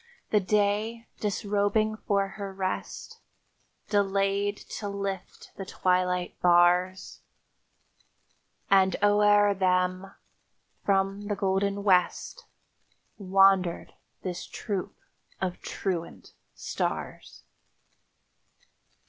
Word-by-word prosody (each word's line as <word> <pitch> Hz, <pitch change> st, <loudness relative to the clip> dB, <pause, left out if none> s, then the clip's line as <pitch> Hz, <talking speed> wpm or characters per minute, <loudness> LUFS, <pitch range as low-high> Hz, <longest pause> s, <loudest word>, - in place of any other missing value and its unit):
The 210 Hz, -, +4 dB
Day, 210 Hz, +3 st, 0 dB
disrobing 210 Hz, +1 st, 0 dB
for 200 Hz, -2 st, 0 dB
her 200 Hz, 0 st, -7 dB
rest, 190 Hz, -1 st, -4 dB, 0.7 s
Delayed 200 Hz, 0 st, +1 dB, 0.2 s
to 205 Hz, -, -4 dB
lift 200 Hz, -2 st, -6 dB
the 195 Hz, -, -5 dB
twilight 180 Hz, -1 st, -1 dB
bars; 180 Hz, +1 st, +3 dB, 1.5 s
And 190 Hz, -1 st, +5 dB
o'er 205 Hz, 0 st, +5 dB
them, 185 Hz, 0 st, 0 dB, 0.7 s
from 195 Hz, +1 st, 0 dB
the 205 Hz, -, -1 dB
golden 200 Hz, 0 st, 0 dB
West, 195 Hz, -, +1 dB, 0.7 s
Wandered 195 Hz, -2 st, +3 dB, 0.3 s
this 180 Hz, -2 st, -5 dB
troop 200 Hz, -5 st, -5 dB, 0.4 s
of 180 Hz, -1 st, -3 dB
truant 175 Hz, -4 st, -5 dB, 0.2 s
stars. -, -, -4 dB
195 Hz, 80 wpm, -27 LUFS, 185-205 Hz, 1.5 s, And